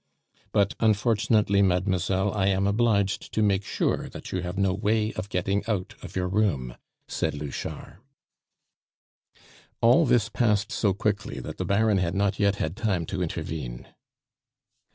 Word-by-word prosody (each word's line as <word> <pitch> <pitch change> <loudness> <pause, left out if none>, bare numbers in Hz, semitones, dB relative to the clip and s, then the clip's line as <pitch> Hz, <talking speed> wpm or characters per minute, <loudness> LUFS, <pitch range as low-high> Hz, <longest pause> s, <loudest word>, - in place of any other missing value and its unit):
"But, 100 -1 +2
unfortunately, 110 -1 +3
mademoiselle, 95 +1 +1
I 95 -2 +1
am 95 0 +2
obliged 100 -2 +1
to 110 - +2
make 100 -1 +2
sure - - -1
that - - -9
you 95 - -1
have 90 +1 -5
no 100 -2 +2
way 105 +2 0
of 95 +2 -5
getting 95 +2 0
out 100 -4 -2
of - - -10
your 90 -1 0
room," 90 - 0 0.3
said - - -2
Louchard. 75 +3 -6 1.8
All 125 +7 +5
this 120 -3 +3
passed 105 -3 +1
so 100 -4 +1
quickly 100 0 -2
that - - -7
the - - -2
Baron 105 0 +2
had 85 -1 -1
not 100 0 0
yet 100 -1 +3
had 80 -3 -3
time 100 -7 -1
to 95 +3 -4
intervene. 80 -7 -5
100 Hz, 150 wpm, -26 LUFS, 90-105 Hz, 1.8 s, All